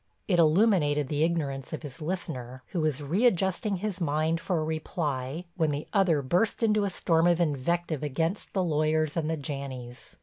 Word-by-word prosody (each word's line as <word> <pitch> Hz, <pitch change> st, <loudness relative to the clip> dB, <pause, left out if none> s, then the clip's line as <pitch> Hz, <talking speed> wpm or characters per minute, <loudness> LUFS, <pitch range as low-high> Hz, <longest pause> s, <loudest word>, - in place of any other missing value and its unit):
It 180 Hz, -4 st, +2 dB
illuminated 155 Hz, -, +3 dB
the 150 Hz, 0 st, +1 dB
ignorance 145 Hz, -6 st, -1 dB
of 155 Hz, -, -5 dB
his 145 Hz, +2 st, -8 dB
listener, 130 Hz, -7 st, -4 dB
who 175 Hz, -, -2 dB
was 150 Hz, -2 st, 0 dB
readjusting 190 Hz, -, +2 dB
his 195 Hz, 0 st, -4 dB
mind 160 Hz, +1 st, +1 dB
for 180 Hz, -, -1 dB
a -, -, -1 dB
reply 155 Hz, -1 st, -3 dB
when 160 Hz, -3 st, +2 dB
the 145 Hz, +1 st, -2 dB
other 180 Hz, -8 st, +3 dB
burst 180 Hz, -, +1 dB
into 210 Hz, -2 st, +3 dB
a -, -, 0 dB
storm 165 Hz, -2 st, +2 dB
of 175 Hz, -1 st, +3 dB
invective 160 Hz, 0 st, 0 dB
against 160 Hz, +6 st, -2 dB
the 190 Hz, -, +1 dB
lawyers 155 Hz, -1 st, +1 dB
and 160 Hz, -2 st, -1 dB
the 160 Hz, -, -1 dB
Janneys. 135 Hz, -4 st, -7 dB
160 Hz, 175 wpm, -28 LUFS, 145-175 Hz, -, illuminated